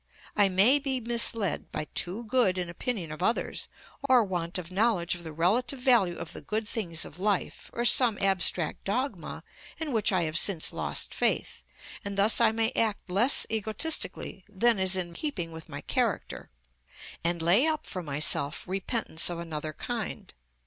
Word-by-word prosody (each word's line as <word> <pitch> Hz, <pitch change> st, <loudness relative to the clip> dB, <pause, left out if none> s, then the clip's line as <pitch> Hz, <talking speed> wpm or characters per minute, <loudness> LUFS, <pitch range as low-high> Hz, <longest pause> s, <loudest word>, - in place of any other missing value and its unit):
I 205 Hz, -2 st, +4 dB
may 205 Hz, +10 st, +5 dB
be 270 Hz, -2 st, -2 dB
misled 230 Hz, -4 st, +1 dB
by -, -, -4 dB
too 190 Hz, +7 st, -2 dB
good 225 Hz, -5 st, +1 dB
an 175 Hz, -2 st, -4 dB
opinion 180 Hz, -4 st, -4 dB
of 155 Hz, +2 st, -8 dB
others, 225 Hz, +6 st, -1 dB, 0.4 s
or 250 Hz, -3 st, +6 dB
want 175 Hz, -3 st, -3 dB
of 180 Hz, -1 st, -7 dB
knowledge 195 Hz, -3 st, +1 dB
of 175 Hz, -1 st, -7 dB
the 160 Hz, -, -7 dB
relative 220 Hz, -, 0 dB
value 240 Hz, -9 st, +2 dB
of 165 Hz, -1 st, -7 dB
the -, -, -9 dB
good 215 Hz, 0 st, -4 dB
things 175 Hz, -8 st, -2 dB
of 165 Hz, -, -12 dB
life, 200 Hz, -1 st, -2 dB
or 240 Hz, -, -3 dB
some 240 Hz, -3 st, +5 dB
abstract 185 Hz, -4 st, +1 dB
dogma 200 Hz, -, -4 dB, 0.3 s
in 320 Hz, -3 st, -4 dB
which 220 Hz, -4 st, +3 dB
I 185 Hz, -3 st, +1 dB
have 160 Hz, 0 st, +2 dB
since 180 Hz, -6 st, +2 dB
lost -, -, -2 dB
faith, -, -, -1 dB, 0.4 s
and 200 Hz, -1 st, -5 dB
thus 210 Hz, +4 st, +4 dB
I 225 Hz, -2 st, +5 dB
may 225 Hz, +1 st, 0 dB
act 215 Hz, -4 st, -1 dB
less 230 Hz, +9 st, +4 dB
egotistically 220 Hz, -, -2 dB
than 215 Hz, +2 st, +2 dB
is 190 Hz, 0 st, +3 dB
in 175 Hz, -2 st, -2 dB
keeping 180 Hz, -, -4 dB
with 160 Hz, 0 st, -11 dB
my 145 Hz, -1 st, -7 dB
character, 235 Hz, -8 st, -3 dB, 0.7 s
and 170 Hz, +1 st, 0 dB
lay 180 Hz, -, +4 dB
up 310 Hz, -1 st, -2 dB
for 185 Hz, -, -6 dB
myself 145 Hz, 0 st, +1 dB
repentance 190 Hz, -2 st, +2 dB
of 175 Hz, -, -5 dB
another 155 Hz, -2 st, -5 dB
kind. 230 Hz, +5 st, -6 dB
195 Hz, 170 wpm, -27 LUFS, 170-230 Hz, 0.7 s, or